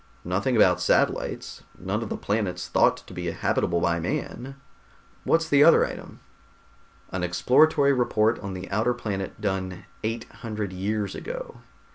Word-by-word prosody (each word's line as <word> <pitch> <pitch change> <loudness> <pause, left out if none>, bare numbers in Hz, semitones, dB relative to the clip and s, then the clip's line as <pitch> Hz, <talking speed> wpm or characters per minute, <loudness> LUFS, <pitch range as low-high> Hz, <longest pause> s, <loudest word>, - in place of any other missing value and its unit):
Nothing 100 +9 0
about 90 -5 +4
satellites. 90 - 0 0.2
None 100 +4 -3
of 115 - -5
the - - -3
planets 95 -3 -2
thought - - +3
to - - -12
be - - -3
habitable 85 0 0
by 85 0 +1
man. 130 +10 -4 0.7
What's 165 0 +2
the 145 -2 +5
other 165 - +6
item?" - - -9 0.9
"An 95 - -3
exploratory 140 - +4
report 115 -3 +2
on 100 -2 -6
the 90 +1 -6
outer 115 +5 +1
planet, 100 -5 -4
done 95 -3 -3 0.2
eight 115 +1 -2 0.2
hundred 105 -4 -4
years 100 +2 -2
ago. - - -7
105 Hz, 145 wpm, -25 LUFS, 95-125 Hz, 0.9 s, other